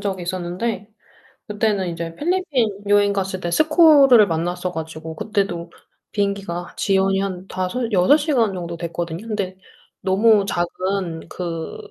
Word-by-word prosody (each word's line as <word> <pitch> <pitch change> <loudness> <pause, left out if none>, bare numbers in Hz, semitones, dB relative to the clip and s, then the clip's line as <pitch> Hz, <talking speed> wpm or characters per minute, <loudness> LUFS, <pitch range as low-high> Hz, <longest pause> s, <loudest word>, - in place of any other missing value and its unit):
적이 190 -3 -3
있었는데 185 +4 -3 0.6
그때는 210 -3 0
이제 165 -1 -5
필리핀 310 - 0 0.2
여행 205 0 +4
갔을 190 -1 -2
때 175 - -3
스콜을 295 - +6
만났어 175 +2 -2
가지고 160 -1 -6
그때도 185 -4 -2 0.4
비행기가 200 -4 -2
지연이 195 -1 +2
한 190 -1 -4
5-6 190 +5 +2
시간 265 -9 +1
정도 170 -2 -5
됐거든요. 170 +3 -5
근데 200 -4 -3 0.5
너무 205 +2 +4
작은 185 -1 -2
그 165 - -5
190 Hz, 270 characters per minute, -21 LUFS, 175-215 Hz, 0.6 s, 스콜을